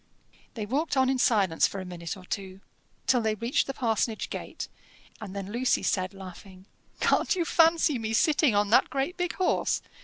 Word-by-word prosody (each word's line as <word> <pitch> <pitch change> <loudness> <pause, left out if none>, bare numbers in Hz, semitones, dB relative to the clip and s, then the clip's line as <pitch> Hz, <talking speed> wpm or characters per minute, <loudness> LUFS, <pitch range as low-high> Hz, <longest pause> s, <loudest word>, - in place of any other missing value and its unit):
They 215 -3 -3
walked 280 +6 -1
on 260 0 +4
in 265 - -1
silence 195 -9 +3
for 195 - -6
a 185 - -6
minute 175 0 -6
or 185 - -12
two, 190 0 -6 0.4
till 250 -2 +3
they 220 -1 0
reached 230 +5 0
the 270 - -3
parsonage 225 -2 -1
gate, - - -6 0.5
and 200 -2 -7
then 200 0 -5
Lucy 245 +3 +1
said, 185 -1 0
laughing, 190 0 -11 0.3
"Can't - - +2
you 345 -2 0
fancy 330 -5 +3
me 220 -1 -3
sitting 295 -1 +3
on 205 0 +1
that - - +5
great 275 +6 -2
big 355 -1 -2
horse? 370 - +1
220 Hz, 185 wpm, -27 LUFS, 195-270 Hz, 0.5 s, that